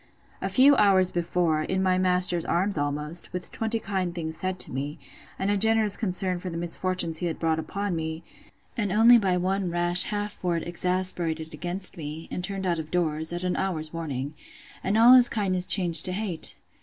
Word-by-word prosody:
A - - -2
few 275 +2 +5
hours 190 -3 +5
before, 170 -2 0
in 190 +4 -2
my 185 -1 +2
master's 180 -2 +1
arms 190 +4 0
almost, 150 +3 -3
with 180 0 -5
twenty 225 0 -2
kind 190 -4 -3
things 160 -2 -4
said 185 +2 -3
to - - -1
me, 145 +4 -5 0.4
and 195 +1 -1
a 205 - +1
generous 220 0 +3
concern 185 -3 -1
for 180 - -6
the 165 - -6
misfortunes 170 -1 0
he 175 - -2
had 165 - -4
brought 160 -1 0
upon 200 +4 -4
me; 160 0 -5 0.5
and 205 -4 -1
only 230 +4 +6
by 190 -4 0
one 190 +1 -1
rash 175 +1 +2
half 205 -1 -4
word 170 -2 -1
exasperated 175 -2 -2
against 175 +5 0
me, 155 +1 -7
and 180 - -4
turned 195 0 -4
out 170 -2 0
of 155 -1 -7
doors, 160 -2 0
at 175 +1 -4
an 180 -1 -1
hour's 160 -5 -3
warning; 145 -4 -5 0.5
and 200 +3 0
all 235 +3 +8
his 250 -2 +7
kindness 185 -4 -1
changed 170 -5 +4
to 185 - +1
hate! 190 -4 -2
180 Hz, 195 wpm, -25 LUFS, 165-195 Hz, 0.5 s, all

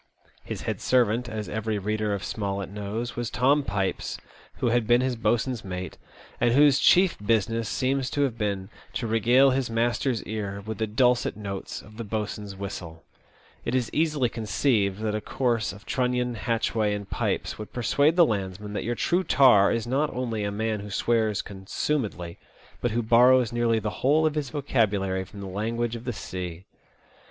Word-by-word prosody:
His - - -6
head - - -3
servant, 120 -1 +2
as 110 -1 -4
every 110 0 -2
reader 105 +1 -1
of 100 -1 -2
Smollett 100 -2 -3
knows, 105 +4 -4
was 120 -1 -2
Tom 135 +5 +3
Pipes, 100 -6 -2 0.4
who 120 - 0
had 120 -2 +1
been 120 +1 +5
his 130 -1 0
boatswain's 120 +1 0
mate, 90 -1 -6 0.4
and 120 0 +3
whose 145 -1 +6
chief 185 -1 +5
business 115 +1 +1
seems 135 0 0
to 145 - 0
have 130 -5 0
been 100 -3 -2 0.2
to 120 - -2
regale 120 +5 +4
his 130 -2 0
master's 120 +1 0
ear 100 -2 -4
^th 110 0 -4
the 110 - 0
dulcet 125 +2 +2
notes 100 -2 -6
of 110 +1 -15
the 115 - -4
boatswain's 105 -2 -4
whistle. 85 -4 -7 0.6
It 120 - -1
is 125 -2 0
easily 150 -5 +2
conceived 110 -2 0
that 110 -1 -1
a 105 - -2
course 120 -3 0
of 100 +2 -13
Trunnion, 125 -1 0
Hatchway, 110 -2 0
and 100 -1 -6
Pipes, - - -2
would 105 - -7
persuade 140 +6 +2
the 175 -1 +7
landsman 100 - -3
that - - -2
your 120 +1 -1
true 175 +8 +1
tar 125 - +5
is 115 -1 -1
not 140 +5 0
only 115 -4 -2
a 100 - -1
man 110 +1 -1
who 105 +1 -8
swears 110 0 +1
consumedly, 95 - -3 0.4
but 120 - +1
who 120 +1 -1
borrows 120 +1 +5
nearly 120 -1 +2
the 105 -1 -2
whole 150 +4 +4
of 155 - +2
his 150 -3 -2
vocabulary 105 -9 0
from 100 +2 -11
the - - -6
language 115 +5 -2
of 115 - -8
the 125 - -2
sea. 90 -3 -6
115 Hz, 180 wpm, -26 LUFS, 105-125 Hz, 0.6 s, the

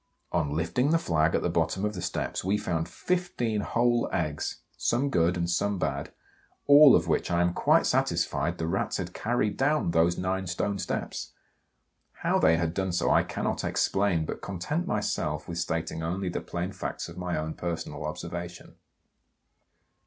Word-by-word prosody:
On 80 -4 +1
lifting 85 - +1
the 165 - +4
flag 80 - +1
at - - 0
the - - +2
bottom 95 +2 0
of 105 - -1
the 90 - -5
steps, 90 - -3
we 95 +3 +1
found 80 -5 -2
15 175 - -1
whole 120 +2 +1
eggs, 75 -3 -2
some 140 +3 0
good 85 -1 +2
and 85 0 -1
some 100 +3 0
bad, 70 -5 -2 0.5
all 145 -1 +9
of - - +2
which - - +1
I 85 0 +2
am 90 0 +2
quite - - +3
satisfied 80 +6 0
the 80 - -2
Rats 85 - -1
had - - -5
carried 110 -2 0
down 145 - +2
those 85 +1 +3
nine 95 +1 -1
stone 100 +3 -1
steps! - - -4 0.9
How - - +3
they 80 +1 +5
had 85 -1 -1
done 95 0 -1
so 90 - +1
I - - +5
cannot - - -2
explain, 95 -5 +1
but - - -5
content 150 - -3
myself 85 -8 -1
with 85 -1 -4
stating 85 -1 -2
only 90 +3 -2
the - - -3
plain 90 +2 -4
facts - - -5
of 85 - -10
my 90 -1 -2
own 80 +1 -3
personal 85 -3 -4
observation. 85 +3 -6
90 Hz, 175 wpm, -28 LUFS, 85-105 Hz, 0.9 s, all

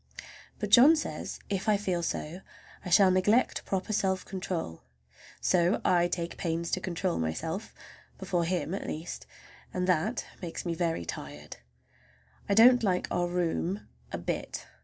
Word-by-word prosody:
But 210 -1 -4
John 270 +9 +9
says 310 - -4
if 195 +1 -1
I 210 - +4
feel 185 -4 -1
so 170 +1 -4 0.4
I 185 - -5
shall 190 +2 +6
neglect 205 +7 +2
proper 195 +3 -2
self 190 -2 0
control; 180 - -4 0.6
so 180 +1 +2
I 175 -1 +4
take 170 -1 -3
pains 170 -1 -2
to - - +1
control 180 0 -2
myself,—before 80 - -4
him, 175 -1 -1
at 195 - -4
least,—and 175 +2 -7
that 185 +6 +1 0.2
makes 175 -1 -5
me 170 - -1
very 165 - -1
tired. 75 -1 -7 0.9
I 200 - +3
don't 245 +3 +7
like 185 -5 0
our 175 0 +1
room 175 +2 -1 0.2
a - - -3
bit. - - -4
180 Hz, 140 wpm, -29 LUFS, 170-195 Hz, 0.9 s, John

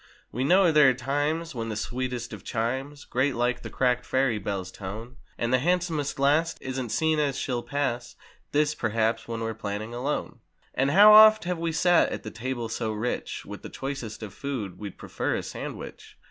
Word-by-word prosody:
We 125 - -2
know 180 +4 +5
there 150 -3 +7
are 130 - +1
times 145 +6 -1
when 115 -2 -4
the 110 - -3
sweetest 125 +1 -3
of 100 -3 -9
chimes 130 +5 -3
Grate 130 +2 0
like 120 +1 0
the - - -7
cracked 125 -1 +1
ferry 130 -5 +1
bell's 95 -2 -4
tone; 110 +7 -8 0.2
And 120 +1 -1
the 130 - +5
handsomest 165 -2 0
lass 150 +4 +2
isn't 130 -2 -4
seen 160 +4 +1
as 140 -3 0
she'll 125 -4 -2
pass 130 -3 -2 0.4
(This, 150 0 +2
perhaps, 115 -2 0
when 115 -1 -4
we're 115 0 -2
planning 110 +1 -5
a 120 - -5
loan) 145 +3 -3 0.3
And 135 +2 +1
how 205 +7 +8
oft 215 0 +9
have 175 -1 -2
we 165 0 -1
sat 175 +1 +4
at - - -5
the 110 - -6
table 120 0 -4
so 110 0 -2
rich 110 +3 -3
With - - -8
the - - -8
choicest 135 -5 -5
of 100 -3 -7
food, 120 -10 -5
we'd 100 -2 -7
prefer - - -2
a - - -3
sandwich. - - -8
130 Hz, 195 wpm, -27 LUFS, 115-150 Hz, 0.4 s, oft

